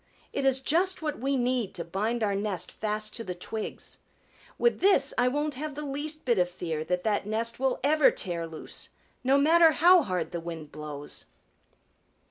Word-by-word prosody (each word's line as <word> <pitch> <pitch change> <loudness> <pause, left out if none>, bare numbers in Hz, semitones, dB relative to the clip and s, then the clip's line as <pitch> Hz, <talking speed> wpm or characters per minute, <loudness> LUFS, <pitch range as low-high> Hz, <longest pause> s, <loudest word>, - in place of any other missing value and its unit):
It 275 - -1
is 265 0 +3
just 350 +5 +1
what 300 -1 -2
we 270 +2 0
need 245 -4 0
to 170 - -4
bind 215 +7 -1
our 205 -2 +1
nest 195 -3 -2
fast 215 0 -3
to 230 - -5
the 180 -4 -5
twigs. 215 +4 -6 0.6
With 475 - +2
this 395 +1 +4
I 245 - +3
won't 295 +3 0
have 290 +2 -5
the 300 0 -5
least 295 +2 -4
bit 235 -6 +3
of 180 0 +2
fear 165 -3 -4
that 180 +2 -1
that 205 -2 0
nest 230 +2 -1
will 265 -1 +1
ever 300 +1 +5
tear 170 -3 -3
loose, 160 -1 -8 0.3
no 265 +2 +4
matter 320 +3 +6
how 350 +4 +6
hard 185 - -2
the 170 - -3
wind 165 -3 -7
blows." 150 -1 -8
230 Hz, 185 wpm, -28 LUFS, 180-290 Hz, 0.6 s, matter